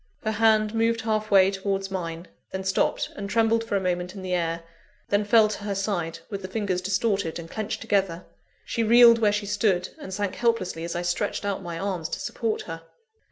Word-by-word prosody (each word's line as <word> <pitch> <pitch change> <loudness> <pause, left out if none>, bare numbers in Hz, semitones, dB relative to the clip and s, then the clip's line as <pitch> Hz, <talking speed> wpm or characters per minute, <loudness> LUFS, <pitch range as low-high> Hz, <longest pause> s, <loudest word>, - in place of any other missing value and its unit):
Her 220 - 0
hand 215 -1 +3
moved 230 0 +1
halfway 215 -3 +3
towards 195 0 -2
mine; 170 -2 -4 0.2
then 190 0 -4
stopped, 190 0 0
and 200 0 -5
trembled 225 +2 +2
for 225 -3 -2
a - - +3
moment 180 0 -2
in 190 - -7
the 185 -1 -2
air; 165 -1 -1 0.5
then 205 +1 +2
fell 215 +1 +5
to 210 -1 -5
her 200 -1 -2
side, 175 -5 -2
with 200 -2 -5
the 185 - -5
fingers 190 -2 -1
distorted 195 -2 0
and 170 -1 -7
clenched 215 -1 -4
together. 195 -6 0 0.4
She 230 - -2
reeled 235 +1 +7
where 215 -2 +4
she 210 0 -1
stood, 200 -3 +1
and 240 - -8
sank 200 0 -2
helplessly 230 -8 0
as 170 0 -4
I 175 - -2
stretched 175 +4 -1
out 200 -1 -2
my 170 -2 -5
arms 180 -4 -3
to - - -4
support 225 -2 -2
her. 165 -1 -7
200 Hz, 205 wpm, -25 LUFS, 180-215 Hz, 0.5 s, reeled